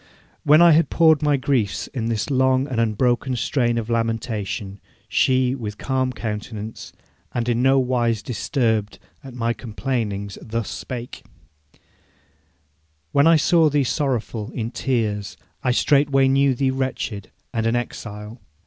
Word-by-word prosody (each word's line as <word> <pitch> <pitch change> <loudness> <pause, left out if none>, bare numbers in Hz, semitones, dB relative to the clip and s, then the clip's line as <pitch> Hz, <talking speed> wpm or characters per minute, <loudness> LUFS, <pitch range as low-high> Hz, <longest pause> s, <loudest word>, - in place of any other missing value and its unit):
V. - - -28 0.4
When 155 +4 +7
I 170 - +8
had 160 +2 +4
poured 160 -3 +4
out - - -23
my 150 -2 +2
griefs 130 -7 0
in 115 -5 -4
this 115 +3 -2
long 130 0 +2
and 125 -5 -1
unbroken 120 +3 +1
strain 120 0 0
of 115 -2 -2
lamentation, 115 -3 -2 0.3
she, 130 -1 +2
with 105 -5 -5
calm 130 -1 -1
countenance, 110 0 -6 0.4
and 120 -1 -1
in 120 0 +1
no 135 +1 +4
wise 120 -4 +1
disturbed 110 -3 -1 0.3
at 130 -2 -10
my 115 -1 0
complainings, 110 -4 -4
thus 115 -1 -4
spake: 125 -1 -7 1.9
'When 140 +2 +4
I 165 - +7
saw 160 0 +4
thee 145 -1 +2
sorrowful, 120 -5 -2
in 115 -1 -3
tears, 110 -7 -2 0.3
I 130 - +1
straightway 135 +1 +3
knew 135 0 +3
thee 130 +1 +1
wretched 130 -6 -3 0.2
and 115 -1 0
an 115 - +1
exile. 110 -1 -6
120 Hz, 145 wpm, -22 LUFS, 110-135 Hz, 1.9 s, I